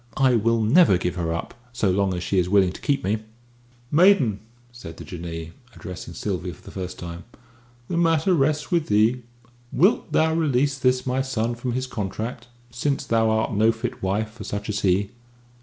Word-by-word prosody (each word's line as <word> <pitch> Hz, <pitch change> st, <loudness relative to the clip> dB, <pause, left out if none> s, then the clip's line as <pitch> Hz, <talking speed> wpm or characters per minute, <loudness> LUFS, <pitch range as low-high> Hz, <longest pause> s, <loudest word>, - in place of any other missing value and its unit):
I 130 Hz, -2 st, +4 dB
will 115 Hz, 0 st, +2 dB
never 125 Hz, -, +5 dB
give 90 Hz, -1 st, -2 dB
her 85 Hz, -2 st, -2 dB
up, 85 Hz, -, -4 dB, 0.2 s
so 105 Hz, -5 st, +1 dB
long 95 Hz, 0 st, +1 dB
as 90 Hz, -, -4 dB
she 95 Hz, -, +1 dB
is 90 Hz, 0 st, 0 dB
willing 95 Hz, -2 st, +4 dB
to -, -, -11 dB
keep 140 Hz, -1 st, 0 dB
me." 105 Hz, +4 st, 0 dB, 0.7 s
"Maiden," 150 Hz, -, +4 dB, 0.3 s
said 85 Hz, -10 st, -10 dB
the -, -, -8 dB
Jinnee, 85 Hz, -2 st, -6 dB, 0.2 s
addressing 90 Hz, -2 st, -8 dB
Sylvia -, -, -3 dB
for -, -, -21 dB
the -, -, -11 dB
first 90 Hz, -1 st, -6 dB
time, 85 Hz, 0 st, -7 dB, 0.6 s
"the 170 Hz, -, -2 dB
matter 165 Hz, +1 st, +3 dB
rests 150 Hz, 0 st, +1 dB
with 170 Hz, -3 st, +1 dB
thee. 110 Hz, +4 st, +3 dB, 0.5 s
Wilt 185 Hz, -, +2 dB
thou 160 Hz, 0 st, +3 dB
release 140 Hz, -3 st, +1 dB
this 125 Hz, 0 st, +2 dB
my 130 Hz, +1 st, 0 dB
son 120 Hz, -3 st, -1 dB
from 120 Hz, +1 st, -4 dB
his 130 Hz, +1 st, -1 dB
contract, 110 Hz, +1 st, -5 dB, 0.2 s
since 135 Hz, +3 st, -1 dB
thou 115 Hz, -2 st, +2 dB
art 110 Hz, 0 st, 0 dB
no 110 Hz, +2 st, +4 dB
fit 115 Hz, 0 st, -5 dB
wife 105 Hz, +3 st, -1 dB
for 115 Hz, -, -10 dB
such 105 Hz, +1 st, -5 dB
as 105 Hz, 0 st, -1 dB
he?" 100 Hz, +1 st, +1 dB
115 Hz, 190 wpm, -24 LUFS, 95-135 Hz, 0.7 s, never